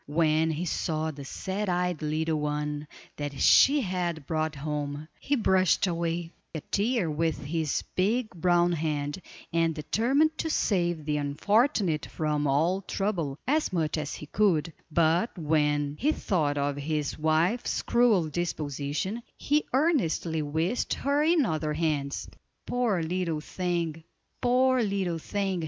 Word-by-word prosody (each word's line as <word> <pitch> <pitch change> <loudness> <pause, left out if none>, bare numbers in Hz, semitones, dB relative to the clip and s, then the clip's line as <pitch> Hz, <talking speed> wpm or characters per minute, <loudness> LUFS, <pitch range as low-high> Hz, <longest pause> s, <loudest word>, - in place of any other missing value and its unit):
"When 155 +1 +2
he 160 +3 -2
saw 160 -2 -1
the 140 -2 -9
sad 190 +8 -3
eyed 180 -2 0
little 155 +1 0
one 150 0 -2 0.3
that 145 -2 -5
she 285 +1 +6
had 175 - -2
brought 155 0 -1
home, 145 0 -4
he 285 - 0
brushed 190 - +3
away 170 -1 -2 0.2
a 160 - -3
tear 210 - 0
with 155 0 -1
his 155 0 -1
big 215 +5 +1
brown 175 0 +2
hand, 150 0 -2 0.3
and 165 -1 +2
determined 265 - +1
to 320 - -1
save 175 - 0
the 150 -1 0
unfortunate 180 - +1
from 150 -2 -1
all 165 +8 +2
trouble, 180 -8 -2
as 305 +3 +1
much 160 -4 0
as 150 -2 -3
he - - -8
could; 165 -2 +1 0.2
but 170 +7 +2
when 150 -2 +1
he 300 - +3
thought 155 - 0
of 140 0 -1
his 150 0 -2
wife's 160 +9 +1
cruel 230 -9 +3
disposition, 155 - -3 0.2
he 300 +1 +1
earnestly 235 - +1
wished 160 +9 -1
her 280 +2 +1
in 315 -2 +3
other 155 -4 -1
hands. 150 -3 -1 0.4
"Poor 230 -9 0
little 170 -1 -1
thing! 170 -1 -3 0.4
poor 255 +1 +3
little 195 -5 -1
thing!" 195 +1 -2
165 Hz, 140 wpm, -28 LUFS, 150-195 Hz, 0.4 s, she